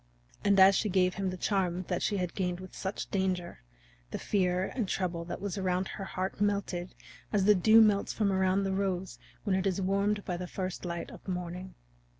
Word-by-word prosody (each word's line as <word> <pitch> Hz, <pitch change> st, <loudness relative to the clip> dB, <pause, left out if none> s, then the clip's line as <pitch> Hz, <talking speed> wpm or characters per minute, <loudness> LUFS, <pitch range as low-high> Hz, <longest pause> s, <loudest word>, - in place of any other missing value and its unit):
And 200 Hz, -1 st, +4 dB
as 190 Hz, +1 st, +9 dB
she 210 Hz, +2 st, +1 dB
gave 180 Hz, -1 st, +3 dB
him 195 Hz, -1 st, -2 dB
the 185 Hz, -, -5 dB
charm 185 Hz, -2 st, 0 dB
that 180 Hz, -1 st, -1 dB
she 205 Hz, -, 0 dB
had 180 Hz, -2 st, -2 dB
gained 180 Hz, -2 st, -2 dB
with 185 Hz, 0 st, -10 dB
such 190 Hz, +1 st, -4 dB
danger, 185 Hz, -, -1 dB, 0.5 s
the -, -, -4 dB
fear 185 Hz, -2 st, +1 dB
and 230 Hz, -7 st, -1 dB
trouble 175 Hz, -3 st, -2 dB
that 175 Hz, -, -5 dB
was 200 Hz, 0 st, -3 dB
around 185 Hz, 0 st, 0 dB
her 200 Hz, -, -6 dB
heart 190 Hz, +1 st, -4 dB
melted 200 Hz, -3 st, -1 dB, 0.4 s
as 200 Hz, -2 st, +2 dB
the 210 Hz, -, +7 dB
dew 215 Hz, +4 st, +6 dB
melts 205 Hz, -2 st, +3 dB
from 205 Hz, -3 st, +1 dB
around 190 Hz, +1 st, +2 dB
the 195 Hz, 0 st, -1 dB
rose 190 Hz, -1 st, -2 dB, 0.2 s
when 200 Hz, -3 st, +1 dB
it 190 Hz, +1 st, +1 dB
is 190 Hz, 0 st, 0 dB
warmed 200 Hz, +2 st, 0 dB
by 180 Hz, -, -2 dB
the 180 Hz, 0 st, -5 dB
first 185 Hz, 0 st, -4 dB
light 170 Hz, -1 st, -4 dB
of -, -, -12 dB
the 190 Hz, -, -3 dB
morning. 180 Hz, +1 st, -5 dB
190 Hz, 210 wpm, -30 LUFS, 180-200 Hz, 0.5 s, as